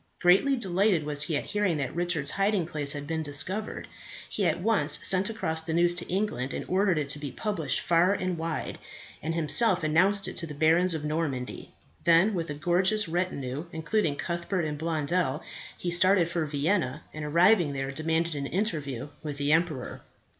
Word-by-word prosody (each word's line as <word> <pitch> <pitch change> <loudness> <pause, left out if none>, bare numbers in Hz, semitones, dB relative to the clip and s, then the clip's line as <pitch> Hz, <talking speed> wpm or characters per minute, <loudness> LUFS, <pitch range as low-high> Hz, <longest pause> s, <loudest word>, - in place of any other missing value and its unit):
Greatly 195 +11 +4
delighted 195 -5 +1
was 145 -1 -1
he 150 0 0
at - - -3
hearing 205 -6 0
that 135 -3 -3
Richard's 170 -4 -1
hiding 195 -2 +1
place 150 -3 +1
had 145 -1 -5
been 160 +1 -2
discovered. 155 +9 -1 0.4
He 200 -4 -1
at 165 +1 0
once 220 +3 +2
sent 190 +3 +3
across 160 -8 -2
the 160 0 -3
news 175 0 +3
to 175 0 -5
England, 180 - -2
and - - -4
ordered 190 -1 +2
it 150 -2 -1
to 145 - -1
be 145 -1 -5
published 170 - -1
far 175 +2 +3
and 185 -3 -1
wide, 165 -1 -4 0.4
and 165 +2 -3
himself 170 +4 +2
announced 190 +6 +3
it - - -6
to 165 - -1
the 150 - -8
barons 165 +4 +3
of 150 -1 -4
Normandy. 150 -5 -3 0.3
Then 170 +6 +4
with 165 -4 -3
a 145 - -4
gorgeous 185 +6 +1
retinue, 160 -5 -3
including 160 0 0
Cuthbert 170 +2 -2
and 150 -1 -3
Blondel, 160 -1 -1 0.3
he 175 - -3
started 180 0 +4
for 165 -2 -2
Vienna, 150 0 -1
and 155 - -6
arriving 170 +1 +4
there 135 0 -3
demanded 160 +3 -1
an 140 -1 -3
interview 150 - -2
with 150 -2 -5
the 145 +1 0
emperor. 160 -5 0
165 Hz, 180 wpm, -27 LUFS, 150-185 Hz, 0.4 s, Greatly